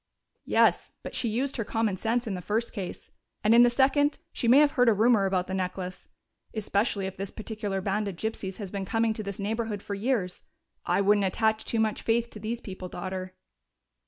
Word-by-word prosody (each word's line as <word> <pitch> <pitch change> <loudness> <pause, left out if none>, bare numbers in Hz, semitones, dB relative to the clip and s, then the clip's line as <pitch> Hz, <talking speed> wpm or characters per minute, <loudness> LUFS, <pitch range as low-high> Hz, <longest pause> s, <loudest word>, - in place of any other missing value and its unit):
"Yes, - - +3
but - - -7
she 235 - 0
used 265 +6 -1
her 230 - 0
common 225 -2 0
sense 230 +5 0
in 215 - -3
the 180 - -4
first 220 +6 -1
case, 195 -5 -6 0.3
and 215 - +5
in 235 - +8
the 245 - +7
second, 280 +4 +3 0.2
she 235 - -2
may 245 +4 +7
have 295 0 +6
heard 245 -3 +4
a 220 - +4
rumor 215 -2 +4
about 185 -1 0
the 190 - -5
necklace 185 0 -4 0.5
especially 205 -1 0
if 190 - -5
this 195 0 -4
particular 210 -3 -4
band 205 +2 -1
of 195 - -4
gypsies 195 -1 -4
has 200 -4 -6
been 200 -1 -3
coming 225 +3 +1
to 215 - -5
this 200 -2 -5
neighborhood 215 0 -2
for 205 - -5
years.... 200 -3 -1 0.5
I - - +3
wouldn't 200 0 +4
attach 220 +3 +1
too 230 - 0
much 220 -1 +1
faith 235 +1 +1
to 215 - -9
these 225 +3 -3
people, 185 -2 -7
Daughter." 185 +1 -5
215 Hz, 210 wpm, -28 LUFS, 195-230 Hz, 0.5 s, in